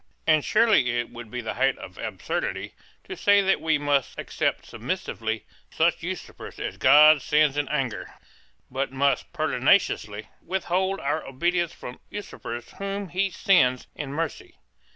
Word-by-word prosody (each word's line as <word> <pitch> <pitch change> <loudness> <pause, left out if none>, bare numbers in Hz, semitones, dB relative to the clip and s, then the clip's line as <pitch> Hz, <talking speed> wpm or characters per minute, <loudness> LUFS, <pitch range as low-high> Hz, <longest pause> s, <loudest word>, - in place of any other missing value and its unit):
And 155 -2 +4
surely 135 - +3
it 120 - -4
would 120 -1 -9
be 125 +2 -4
the 110 -1 -4
height 135 +2 +1
of 90 - -11
absurdity 110 -5 -3 0.3
to - - -7
say 205 0 +4
that 195 0 +2
we 160 -1 +2
must 145 -2 0
accept - - -2
submissively 110 -1 -4 0.3
such - - +1
usurpers - - -7
as - - -4
God 150 0 +7
sends 150 +1 +3
in 145 -1 -1
anger, 130 -9 -3 0.6
but 135 +1 -2
must 140 +1 0
pertinaciously 105 +1 +1 0.2
withhold 190 +1 -1
our 145 +3 -1
obedience 175 +5 0
from 125 - -10
usurpers 120 - -7
whom 200 -1 -4
He 195 +3 0
sends 150 - +3
in 145 -3 -6
mercy. 160 +2 -4
145 Hz, 145 wpm, -25 LUFS, 125-175 Hz, 0.6 s, God